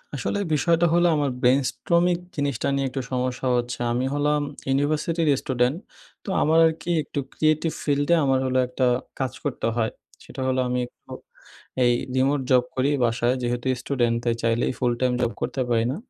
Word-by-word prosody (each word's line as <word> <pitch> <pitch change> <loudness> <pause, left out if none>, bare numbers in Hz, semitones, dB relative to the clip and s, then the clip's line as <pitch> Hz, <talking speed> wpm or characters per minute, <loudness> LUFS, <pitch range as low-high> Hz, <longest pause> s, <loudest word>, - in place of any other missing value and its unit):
আসলে 140 - -2
বিষয়টা 165 +3 +3
হলো 175 0 +4
আমার 145 -2 +1
brainstorming 170 +8 +2 0.2
জিনিসটা 140 -5 -1
নিয়ে 135 -1 0
একটু 130 +1 -4
সমস্যা 125 0 -2
হচ্ছে। 120 0 -3
আমি 125 +2 0
হলাম 150 0 +1 0.3
ইউনিভার্সিটির 155 +4 0
স্টুডেন্ট। 125 +3 0 0.5
তো - - -7
আমার 160 +2 +3
আরকি 160 +2 -4
একটু 145 - -5
creative 155 +1 +1
field 145 -1 +1
এ - - +7
আমার 135 -1 +2
হলো 130 0 0
একটা 130 0 -1 0.3
কাজ 130 -1 -1
করতে 140 -5 -2
হয়। 110 -2 0 0.3
সেটা 130 - -8
হলো 130 0 +1
আমি 125 0 -1
একটু - - -21 0.7
এই 120 0 +4 0.2
remote 135 +1 +2
job 125 -1 +5
করি 130 +2 +1 0.2
বাসায়। 120 +2 +1
যেহেতু 120 +1 -2
স্টুডেন্ট 120 -4 0
তাই 120 - +2
চাইলেই 115 +2 +1
full 120 -2 +2
time 125 -1 +2
job 120 -1 +1
করতে 135 - -2
পারি 115 -1 +2
না। - - -3
130 Hz, 170 wpm, -24 LUFS, 125-150 Hz, 0.7 s, এ